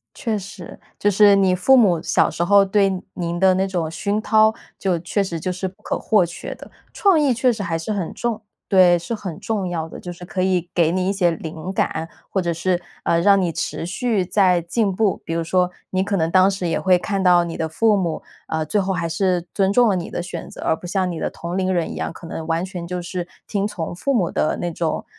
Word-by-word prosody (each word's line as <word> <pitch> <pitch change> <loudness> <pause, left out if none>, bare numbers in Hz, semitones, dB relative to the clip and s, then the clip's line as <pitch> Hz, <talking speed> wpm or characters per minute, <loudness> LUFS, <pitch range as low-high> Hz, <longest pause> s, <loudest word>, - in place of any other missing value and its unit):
确 220 -3 -2
实， 195 -2 -10 0.2
就 205 - +2
是 205 +1 +6
你 190 -2 +3
父 265 +9 +5
母， 190 -9 +4
小 - - +2
时 170 - -1
候 200 +2 +5
对 195 -1 +1
您 170 -1 -3
的 190 -1 +5
那 190 +1 +1
种 175 -4 -2
熏 200 +6 -2
陶， 220 0 +4 0.2
就 185 -3 0
确 190 +4 -1
实 170 -3 -4
就 185 - -2
是 185 +1 -3
不 195 +3 -10
可 - - -2
或 210 -5 +3
缺 170 - -7
的。 - - -13 0.2
创 390 -5 +3
意 275 -4 +3
确 250 +1 +2
实 215 -3 -5
还 165 -1 -1
是 165 +6 -3
很 190 -5 -3
重 235 -2 -2 0.3
对， 185 -3 +6
是 170 +7 -6
很 190 -7 -6
重 205 -5 -2
要 165 -2 -3
的， - - -10
就 175 - -7
是 175 +1 -11
可 185 +1 -4
以 185 -2 0
给 170 -1 +2
你 185 0 0
一 - - +2
些 180 -3 +2
灵 165 +3 -6
感， 165 -3 -1 0.2
或 195 - 0
者 170 -2 -1
是， 175 +2 0 0.2
呃， 170 - +2
让 195 +1 +5
你 175 -3 0
持 165 - -3
续 210 +1 0
在 180 -2 +3
进 195 +2 0
步。 210 -1 +1
比 165 - -3
如 165 - 0
说 180 +1 +1 0.2
你 185 0 0
可 200 +1 -1
能 165 -2 0
当 185 +1 +5
时 190 -2 -3
也 165 - 0
会 185 -1 +4
看 195 +2 -2
到 175 -1 +5
你 165 - -5
的 160 - -2
父 215 +6 +2
母， 170 -4 -2 0.3
呃， 160 0 -1
最 205 +6 0
后 190 0 -1
还 170 -2 -2
是 180 0 0
尊 195 -1 +1
重 240 +1 +5
了 195 - +2
你 170 - -4
的 175 - -3
选 175 -1 -7
择， - - -11
而 - - +2
不 175 - -10
像 185 0 0
你 165 - -5
的 - - -1
同 175 +2 -5
龄 185 0 0
人 170 -2 -1
一 - - -7
样， - - -3
可 170 - -11
能 160 -1 -6
完 165 +1 0
全 180 -2 -6
就 180 0 -4
是 175 0 -4 0.2
听 200 -1 -1
从 175 -5 -5
父 275 +10 -1
母 185 -8 +1
的 155 - 0
那 175 -1 -2
种， 160 0 -2
185 Hz, 270 characters per minute, -21 LUFS, 170-200 Hz, 0.3 s, 是